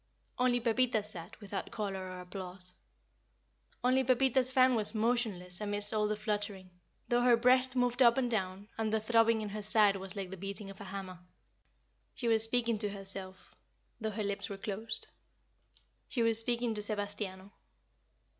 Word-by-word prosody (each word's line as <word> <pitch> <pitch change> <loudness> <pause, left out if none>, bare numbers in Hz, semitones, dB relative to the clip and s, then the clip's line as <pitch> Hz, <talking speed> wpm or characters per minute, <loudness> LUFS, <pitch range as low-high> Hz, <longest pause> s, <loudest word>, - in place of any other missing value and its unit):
Only 250 -1 +3
Pepita 235 -1 +1
sat 180 -5 -10
without 205 -3 -5
color 195 -3 -4
or 185 0 -7
applause 180 0 -7 1.1
only 255 +1 +3
Pepita's 260 0 +2
fan 260 -1 +5
was 220 -1 -2
motionless 215 -5 -1
amidst 205 0 +1
all 210 -1 +1
the 215 - -1
fluttering 205 -3 -3 0.4
though 240 0 +2
her 245 -1 +5
breast 255 +2 +3
moved 245 0 +1
up 235 -1 +6
and 250 -2 0
down, 195 -2 -2
and 220 -1 0
the 220 - +2
throbbing 225 0 +3
in 210 - -4
her 210 +1 -5
side 210 -1 +3
was 190 0 -6
like 195 -2 -5
the 190 - -7
beating 195 +1 -6
of 195 - -13
a - - -7
hammer. 190 -2 -7 1.0
She 240 - -3
was 225 -1 +4
speaking 230 -1 +3
to 210 -1 +1
herself, 195 -1 +1 0.5
though 220 -1 -2
her 215 0 -4
lips 200 0 -3
were 200 - -6
closed; 210 +3 -3 1.0
she 240 - -1
was 225 -1 +5
speaking 235 0 +1
to 210 - -5
Sebastiano. 205 -2 -2
215 Hz, 165 wpm, -32 LUFS, 195-235 Hz, 1.1 s, up